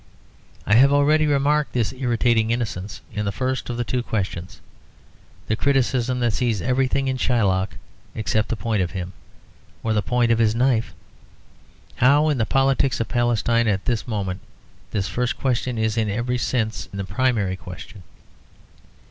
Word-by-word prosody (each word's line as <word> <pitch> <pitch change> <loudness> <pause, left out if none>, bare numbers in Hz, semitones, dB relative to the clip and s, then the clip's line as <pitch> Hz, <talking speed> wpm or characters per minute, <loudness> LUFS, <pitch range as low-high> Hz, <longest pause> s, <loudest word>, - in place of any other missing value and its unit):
I - - +2
have 135 +3 +6
already 150 +2 +4
remarked 145 +1 +1
this 120 -1 0
irritating 120 -3 +1
innocence 110 -5 -3
in 105 0 -2
the 100 - -1
first 130 +5 -2
of 120 - -3
the 120 - 0
two 125 +1 -1
questions; 95 -6 -4 0.9
the 110 - 0
criticism 130 -1 +1
that 120 -2 +1
sees 115 -2 0
everything 130 +4 0
in 130 0 0
Shylock 100 -7 +1 0.4
except 110 0 0
the - - 0
point 110 -2 -1
of 90 - 0
him, 90 -1 -6 0.7
or 110 - 0
the 105 - +2
point 120 +1 +1
of 115 - +3
his 110 -1 +3
knife. 120 -2 +1 1.0
How 145 +5 +4
in 145 -4 0
the 110 - +1
politics 135 0 +2
of 115 - -2
Palestine 120 -1 +1
at 100 -3 0
this 120 -1 -1
moment 95 -5 -3 0.5
this 100 -2 -2
first 125 +6 -1
question 125 -2 -1
is 110 0 0
in 110 -2 0
every 120 +4 -1
sense 110 -3 -2
the 100 0 -4
primary 110 -5 0
question. 95 +2 -10
115 Hz, 160 wpm, -22 LUFS, 105-130 Hz, 1.0 s, have